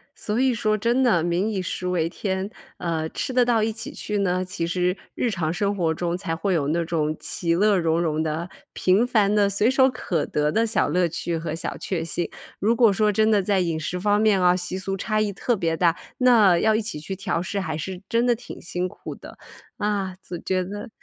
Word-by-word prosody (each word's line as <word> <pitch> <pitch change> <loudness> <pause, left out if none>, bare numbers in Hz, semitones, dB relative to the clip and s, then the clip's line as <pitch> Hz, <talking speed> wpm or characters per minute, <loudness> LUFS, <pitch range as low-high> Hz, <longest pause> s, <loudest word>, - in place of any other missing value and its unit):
所 210 +2 -2
以 260 -1 +3
说 215 -2 +1
真 235 +5 +2
的 220 -10 +4
民 175 +5 0
以 200 -4 -2
食 180 0 -4
为 175 -3 +1
天， 190 +2 -3 0.3
呃， 160 -2 -2
吃 260 - -4
得 250 0 +5
到 235 -2 +2
一 220 +1 +1
起 225 - -6
去 210 -1 -3
呢， 185 -1 0
其 185 -2 -3
实 180 +1 0 0.2
日 245 - 0
常 170 -7 -1
生 200 +3 0
活 165 -4 +1
中 175 +1 -2
才 185 -4 -3
会 190 +3 -1
有 150 -5 +1
那 170 +2 0
种 155 -2 -1
其 170 -2 -1
乐 205 +3 +3
融 165 -1 +1
融 160 -2 0
的 160 +3 -3 0.2
平 190 +6 +3
凡 210 -4 +2
的 205 -1 +3
随 205 +3 +2
手 265 0 +4
可 180 - -2
得 150 0 0
的 225 +5 +2
小 225 - +1
乐 175 +4 +2
趣 170 0 -3
和 160 -1 -4
小 165 - -4
确 175 -4 -3
幸。 165 +1 -2 0.3
如 220 +4 +2
果 230 -4 +5
说 210 +1 +2
真 215 +2 +3
的 210 -2 +4
在 195 0 +1
饮 170 -3 0
食 175 +3 -3
方 205 +2 +2
面 210 -3 +3
啊， 180 0 +5
习 180 0 -3
俗 195 0 -3
差 215 +3 -1
异 210 -1 0
特 240 +5 0
别 165 -3 0
大， 170 0 +2 0.2
那 225 -8 +6
要 220 +5 +3
一 220 - +1
起 210 -8 -4
去 155 +5 -5
调 190 -3 -2
试 200 +3 -3
还 160 -5 -3
是 180 +3 -5
真 235 +1 +1
的 240 -1 +3
挺 240 - -10
辛 180 +1 -2
苦 - - -9
的。 - - -12 0.4
啊， 200 -3 -1
就 175 - -5
觉 185 +1 -1
得， 205 +6 -7
190 Hz, 250 characters per minute, -24 LUFS, 170-215 Hz, 0.4 s, 那